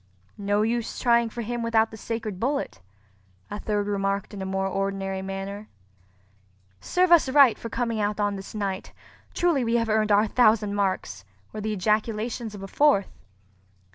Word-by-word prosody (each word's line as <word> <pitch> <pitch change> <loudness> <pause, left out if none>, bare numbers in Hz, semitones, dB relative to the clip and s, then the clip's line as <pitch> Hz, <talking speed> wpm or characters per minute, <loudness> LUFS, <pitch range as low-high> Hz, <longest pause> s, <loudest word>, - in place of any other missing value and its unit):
"No 205 +1 +1
use 230 +1 -2
trying 235 -2 +3
for 235 +1 -5
him 240 +2 -3
without 225 -1 +2
the - - -8
sacred 220 -3 -5
bullet," 265 - -2 0.7
a 205 - -4
third 205 -1 -1
remarked 200 0 -2
in 200 - -6
a 190 - -3
more 190 0 -1
ordinary 195 0 -2
manner. 195 +2 -6 1.1
"Serve 360 - +1
us 335 -6 +6
right 270 -3 +6
for 230 - -7
coming 230 -1 -2
out 210 +1 -1
on 205 -1 0
this 195 +2 -9
night! 200 -2 -3 0.4
Truly 340 -7 +2
we 230 0 0
have 230 -1 +1
earned 215 0 +2
our 205 +1 +5
thousand 215 -2 +3
marks!" 185 - -2 0.3
were 215 - -5
the 215 +1 -2
ejaculations 215 +2 -1
of 195 - -9
a - - -6
fourth. 280 -4 +2
215 Hz, 170 wpm, -25 LUFS, 195-230 Hz, 1.1 s, us